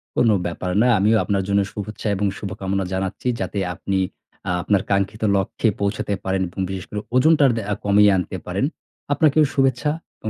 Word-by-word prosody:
কোন 115 Hz, -, +3 dB, 0.2 s
ব্যাপার 90 Hz, +1 st, -3 dB
না। 125 Hz, -, +4 dB
আমিও 110 Hz, +3 st, +4 dB
আপনার 100 Hz, -2 st, 0 dB
জন্য 100 Hz, 0 st, +3 dB
শুভেচ্ছা, 105 Hz, +1 st, -6 dB
এবং 100 Hz, +2 st, -1 dB
শুভকামনা 95 Hz, -1 st, -3 dB
জানাচ্ছি। 95 Hz, +5 st, -3 dB
যাতে 95 Hz, +2 st, -3 dB, 0.2 s
আপনি 95 Hz, +1 st, -1 dB, 0.5 s
আ -, -, +1 dB
আপনার 100 Hz, +1 st, +2 dB
কাঙ্ক্ষিত 100 Hz, +2 st, 0 dB
লক্ষ্যে 95 Hz, +4 st, 0 dB
পৌঁছাতে 100 Hz, 0 st, -1 dB
পারেন, 95 Hz, 0 st, 0 dB
এবং 90 Hz, -, -10 dB
বিশেষ 95 Hz, -1 st, -5 dB
করে 105 Hz, -, -4 dB, 0.2 s
ওজনটা 150 Hz, +4 st, +5 dB
দে -, -, -1 dB, 0.2 s
কমিয়ে 100 Hz, 0 st, +5 dB
আনতে 95 Hz, +1 st, -3 dB
পারেন। 95 Hz, +8 st, -1 dB, 0.5 s
আপনাকেও 155 Hz, 0 st, +4 dB
শুভেচ্ছা 135 Hz, +2 st, +2 dB, 0.3 s
এবং 110 Hz, -, -4 dB
100 Hz, 170 wpm, -22 LUFS, 95-115 Hz, 0.5 s, ওজনটা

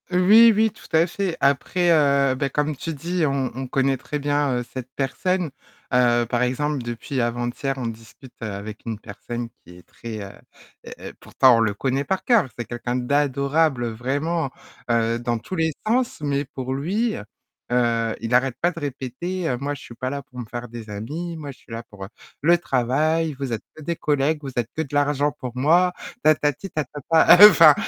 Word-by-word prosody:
Oui, 205 Hz, +6 st, +7 dB
oui, 220 Hz, +1 st, +2 dB
tout -, -, -18 dB
à 165 Hz, +2 st, +4 dB
fait, 185 Hz, -1 st, -3 dB
après, 145 Hz, +6 st, +2 dB
heu, 140 Hz, -4 st, +3 dB
bah, 140 Hz, +1 st, -1 dB
comme 150 Hz, +2 st, -1 dB
tu 165 Hz, +4 st, -5 dB
dis 170 Hz, +3 st, -1 dB
on 135 Hz, -2 st, 0 dB
on 130 Hz, 0 st, -4 dB
connaît 135 Hz, +1 st, +1 dB
très 150 Hz, +3 st, -5 dB
bien, 145 Hz, -2 st, +1 dB
heu, -, -, -3 dB
cette 130 Hz, -1 st, -6 dB
personne. 170 Hz, +5 st, -1 dB, 0.4 s
Heu, 120 Hz, -1 st, +4 dB
par 120 Hz, +1 st, -1 dB
exemple, 145 Hz, +4 st, -1 dB
depuis 120 Hz, +3 st, -3 dB
avant-hier, 120 Hz, +3 st, -2 dB
on 130 Hz, -, -4 dB
discute 115 Hz, +3 st, -11 dB
avec 105 Hz, 0 st, -6 dB
une 110 Hz, -3 st, -4 dB
personne 120 Hz, +4 st, -6 dB, 0.2 s
qui 90 Hz, 0 st, -14 dB
est 90 Hz, -, -16 dB
très, 110 Hz, -2 st, -8 dB
heu, 100 Hz, 0 st, -7 dB, 0.7 s
heu -, -, -8 dB
pourtant 130 Hz, -3 st, +4 dB
on -, -, +2 dB
le 110 Hz, -2 st, +1 dB
connaît 135 Hz, +6 st, -1 dB
par 190 Hz, +5 st, -2 dB
cœur, 235 Hz, -, +4 dB
c'est 120 Hz, -, -4 dB
quelqu'un 120 Hz, 0 st, -4 dB
d'adorable 140 Hz, 0 st, +1 dB
vraiment, 140 Hz, +7 st, -2 dB, 0.4 s
heu, 115 Hz, 0 st, +2 dB
dans 120 Hz, 0 st, -1 dB
tous 150 Hz, +11 st, -7 dB
les 160 Hz, -2 st, +1 dB, 0.2 s
sens, 245 Hz, +3 st, +1 dB
mais 140 Hz, -1 st, 0 dB
pour 130 Hz, -1 st, -5 dB
lui, 200 Hz, -, -1 dB, 0.6 s
heu, 115 Hz, -2 st, +1 dB
il 115 Hz, +1 st, -3 dB
arrête 125 Hz, 0 st, +2 dB
pas 175 Hz, -, +3 dB
de 170 Hz, -, -8 dB
répéter, 145 Hz, +6 st, -4 dB
heu: 125 Hz, -, -1 dB
«Moi 140 Hz, +2 st, -2 dB
je -, -, -12 dB
suis 120 Hz, -, -11 dB
pas 130 Hz, +2 st, -3 dB
là 140 Hz, +1 st, -4 dB
pour 125 Hz, -1 st, -12 dB
me 120 Hz, -, -5 dB
faire 120 Hz, +2 st, -6 dB
des 115 Hz, -2 st, -9 dB
amis, 150 Hz, +12 st, -5 dB
moi 145 Hz, -3 st, -7 dB
je 130 Hz, -, -16 dB
suis -, -, -19 dB
là 115 Hz, +1 st, -5 dB
pour 100 Hz, -4 st, -10 dB, 0.3 s
le 170 Hz, +4 st, +5 dB
travail, 155 Hz, +3 st, 0 dB
vous 135 Hz, -3 st, -3 dB
êtes 110 Hz, -, -4 dB
que 155 Hz, -, -11 dB
des 170 Hz, +3 st, -2 dB
collègues, 150 Hz, +1 st, +1 dB
vous 135 Hz, -2 st, -6 dB
êtes 120 Hz, -2 st, -1 dB
que 160 Hz, -, -1 dB
de 145 Hz, -3 st, -7 dB
l'argent 145 Hz, 0 st, +2 dB
pour 130 Hz, -4 st, -7 dB
moi», 175 Hz, +7 st, +4 dB, 0.3 s
tatati 155 Hz, +3 st, +2 dB
tatata, 160 Hz, +3 st, +4 dB
heu, 210 Hz, -, +14 dB
enfin, 165 Hz, -6 st, +8 dB
140 Hz, 200 wpm, -23 LUFS, 120-160 Hz, 0.7 s, heu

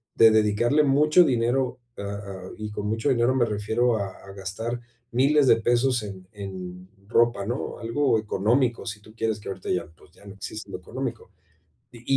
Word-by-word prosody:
de 115 Hz, -1 st, +7 dB
dedicarle 110 Hz, +7 st, +3 dB
mucho 150 Hz, +5 st, +5 dB
dinero, 125 Hz, 0 st, +1 dB, 0.2 s
a 100 Hz, -, -5 dB
a, 100 Hz, -2 st, -6 dB
y 105 Hz, 0 st, -5 dB
con 105 Hz, 0 st, -4 dB
mucho 115 Hz, +5 st, 0 dB
dinero 125 Hz, 0 st, +3 dB
me 125 Hz, -, +3 dB
refiero 110 Hz, +2 st, +1 dB
a 100 Hz, -, -2 dB, 0.2 s
a 100 Hz, -, -10 dB
gastar 105 Hz, +5 st, -4 dB, 0.3 s
1000 140 Hz, +4 st, +4 dB
de 115 Hz, -, +6 dB
pesos 120 Hz, +1 st, +2 dB
en 95 Hz, -2 st, -8 dB
en 95 Hz, -3 st, -8 dB, 0.2 s
ropa, 120 Hz, -3 st, +3 dB
¿no? 120 Hz, +5 st, -4 dB
Algo 115 Hz, +1 st, +1 dB
económico, 115 Hz, +4 st, +1 dB
si 105 Hz, -2 st, -5 dB
tú 110 Hz, +1 st, -16 dB
quieres 110 Hz, -2 st, -1 dB
que -, -, -7 dB
ahorita 95 Hz, -1 st, -6 dB
ya, 90 Hz, -3 st, -1 dB
pues, 90 Hz, -, -20 dB
ya 100 Hz, -, -19 dB
no 100 Hz, 0 st, -10 dB
existe 110 Hz, +3 st, -7 dB
lo -, -, -4 dB
económico. -, -, -6 dB, 0.6 s
Y 120 Hz, 0 st, -14 dB
110 Hz, 180 wpm, -25 LUFS, 100-120 Hz, 0.6 s, de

